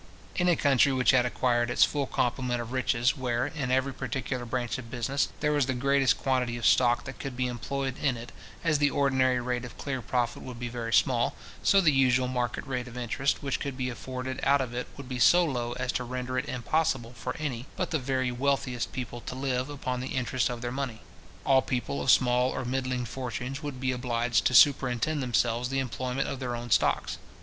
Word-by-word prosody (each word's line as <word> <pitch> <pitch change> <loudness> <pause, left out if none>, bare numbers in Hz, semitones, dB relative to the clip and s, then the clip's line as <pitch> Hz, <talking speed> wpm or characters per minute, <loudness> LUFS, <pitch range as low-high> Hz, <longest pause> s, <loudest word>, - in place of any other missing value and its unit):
In 180 0 +2
a 175 - +5
country 140 -2 +4
which 130 -1 +4
had 125 -2 +4
acquired 120 -1 +1
its 120 - +4
full 140 -2 +1
complement 125 0 -1
of 120 0 -5
riches, 130 0 +1
where, 125 -2 -1
in 140 -6 -3
every 130 +1 +1
particular 130 -2 -3
branch 120 +1 -2
of 115 -2 -9
business, 130 +4 -1
there 150 0 +2
was 145 -3 +2
the 130 - 0
greatest 135 +1 +3
quantity 125 -3 0
of 115 - -4
stock 120 +1 +4
that 130 - -8
could 135 -3 -6
be 125 - +1
employed 130 +2 -3
in 135 -4 +1
it, 115 +1 -9 0.3
as 155 -3 +2
the 145 -1 +4
ordinary 130 -3 +2
rate 125 0 -2
of 125 - -9
clear 135 -3 -3
profit 120 -1 -1
would 125 -2 -8
be 120 0 -3
very 115 -1 -4
small, 120 0 +3 0.3
so 195 - +5
the 170 -5 +5
usual 130 -1 +3
market 125 -1 -2
rate 125 -2 -3
of 125 0 -9
interest 125 +4 -1
which 140 -1 -1
could 140 -2 -4
be 125 -1 -2
afforded 130 +1 -5
out 140 +1 +4
of 130 -3 -3
it 125 +1 -3
would 140 -2 -8
be 125 -1 -4
so 175 +7 +6
low 120 -5 -2
as 130 0 -2
to 125 - -2
render 125 +1 -4
it 130 +3 -2
impossible 130 -1 0
for 125 +1 -5
any 135 -5 -4
but 180 -1 -2
the 160 - +1
very 130 -1 -1
wealthiest 125 -1 -1
people 120 -2 -5
to 125 - -6
live 130 0 -1
upon 130 -3 -3
the 130 - -4
interest 130 -1 0
of 120 -1 -5
their 120 - -2
money. 130 -4 -4 0.4
All 135 -1 +5
people 120 - -2
of - - -1
small 125 0 +4
or 130 - -3
middling 130 -1 -1
fortunes 125 +2 -5
would 145 -4 -5
be 130 0 0
obliged 120 -2 0
to 130 - +3
superintend 135 +2 +4
themselves 120 -1 +1
the 135 - -1
employment 130 +1 -2
of 135 - -4
their 125 -2 -3
own 120 0 -7
stocks. - - +2
130 Hz, 215 wpm, -28 LUFS, 120-135 Hz, 0.4 s, so